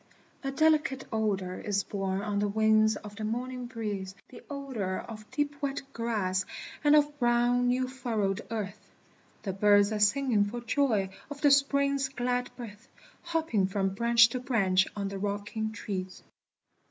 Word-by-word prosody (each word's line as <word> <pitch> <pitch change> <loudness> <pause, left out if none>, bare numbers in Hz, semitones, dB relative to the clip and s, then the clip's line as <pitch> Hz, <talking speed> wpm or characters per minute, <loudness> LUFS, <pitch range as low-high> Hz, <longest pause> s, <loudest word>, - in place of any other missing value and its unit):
A 270 - -1
delicate 300 -2 +2
odor 195 -4 -1
is 200 -1 -1
borne 195 -1 -2
on 205 -1 -1
the 205 - +1
wings 215 +1 +3
of 210 0 -9
the 220 - -5
morning 245 +3 -3
breeze, 205 -5 -4
The - - -12
odor 260 -10 -3
of 215 -2 -9
deep 290 +3 -2
wet 275 -1 -2
grass, 205 -5 -1 0.4
and 295 0 +6
of 295 0 +2
brown 240 0 +3
new 255 +1 +1
furrowed 230 -7 -2
earth, 210 -2 -4 0.6
The 195 - -2
birds 205 +1 +4
are 215 - -1
singing 215 0 +3
for 225 +4 -4
joy 235 -6 +1 0.2
of 290 -1 -8
the 290 - +5
Spring's 280 -1 +3
glad 250 -1 -1
birth, 225 0 -10 0.3
Hopping 320 - 0
from 195 0 0
branch 235 +2 +5
to 255 - -3
branch 195 -7 +2
on 200 -1 -2
the 195 0 -5
rocking 205 +2 -3
trees. 190 -4 -5
225 Hz, 155 wpm, -29 LUFS, 205-260 Hz, 0.6 s, and